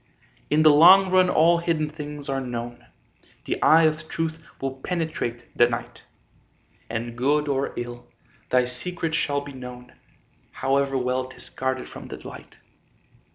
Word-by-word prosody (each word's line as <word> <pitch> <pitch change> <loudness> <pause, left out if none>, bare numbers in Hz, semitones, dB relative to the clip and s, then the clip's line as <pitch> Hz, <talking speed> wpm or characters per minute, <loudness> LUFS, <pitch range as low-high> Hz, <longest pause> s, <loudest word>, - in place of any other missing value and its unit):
In 155 +1 +3
the 155 - +8
long 185 +5 +7
run 185 -1 +5
all 170 +1 +4
hidden 165 -3 0
things 150 -1 -7
are 135 -1 -1
known, 120 -1 -6 0.6
The - - -3
eye 165 +1 +6
of 155 0 0
truth 165 0 -3 0.2
will 135 0 -4
penetrate 155 -9 -4
the 120 0 +5
night, 120 -1 -6 0.8
And 115 +1 -4
good 145 +5 +1
or 140 -1 -1
ill, 120 0 -6 0.4
thy 125 -1 +3
secret 160 +6 -4
shall 145 -3 0
be 140 0 -9
known, 125 -1 -10 0.6
However 135 0 0
well 130 0 -1
'tis 130 - -11
guarded 130 0 -3
from - - -10
the - - -7
light. - - -12
140 Hz, 150 wpm, -24 LUFS, 125-160 Hz, 0.8 s, the